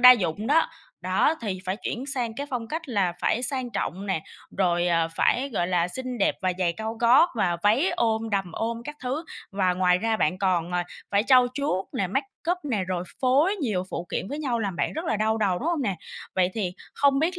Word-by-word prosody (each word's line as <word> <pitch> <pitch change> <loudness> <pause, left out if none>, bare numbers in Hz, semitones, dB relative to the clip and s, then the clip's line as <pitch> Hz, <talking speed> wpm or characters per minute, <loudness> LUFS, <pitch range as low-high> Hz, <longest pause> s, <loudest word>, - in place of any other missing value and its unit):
đa 250 0 +11
dụng 205 -2 +2
đó, 320 +3 +4 0.3
đó, 185 - +2
thì 195 -5 -3
phải 185 +1 -1
chuyển 245 - -3
sang 245 -5 -2
cái 285 - -3
phong 240 -3 -3
cách 320 +1 -4
là 195 -7 +1
phải 245 - +1
sang 260 -2 -1
trọng 195 -1 -3
nè, 185 -5 -1 0.4
rồi, 175 -2 +2
à, 165 -1 +2
phải, 250 +10 +1
gọi 175 -4 0
là, 175 -1 +1
xinh 255 +4 -4
đẹp 195 - +2
và 185 -1 +2
giày 175 -2 +2
cao 220 +4 -4
gót 245 +9 +5
và 185 -6 +1
váy 235 - +4
ôm, 225 -1 0
đầm 195 -4 -1
ôm 230 +3 -3
các 295 +3 -6
thứ. 275 +6 -2 0.3
Và 185 -2 +2
ngoài 180 -1 +3
ra 225 +2 0
bạn 180 -1 +1
còn, 180 -3 +1
à, 175 0 0 0.3
phải 200 +1 +3
trau 255 0 +6
chuốt 270 -10 0
nè, 195 - 0
make 270 +10 -1 0.2
up 360 - +1
nè, 220 -9 0
rồi 180 -1 -2 0.2
phối 285 +10 +3
nhiều 215 - -1
phụ 170 - -4
kiện 190 - -2
với 290 +4 -4
nhau 255 -6 -1
làm 200 -5 -2
bạn - - 0
rất 320 - -4
là 225 - 0
đau 220 +1 +1
đầu, 190 -4 +1
đúng 310 - -2
hông 335 -4 0
nè? 200 -6 -1 0.4
Vậy 185 0 +2
thì 190 -5 -1 0.2
không 280 -1 +3
biết 350 +4 0
220 Hz, 230 wpm, -26 LUFS, 185-260 Hz, 0.4 s, đa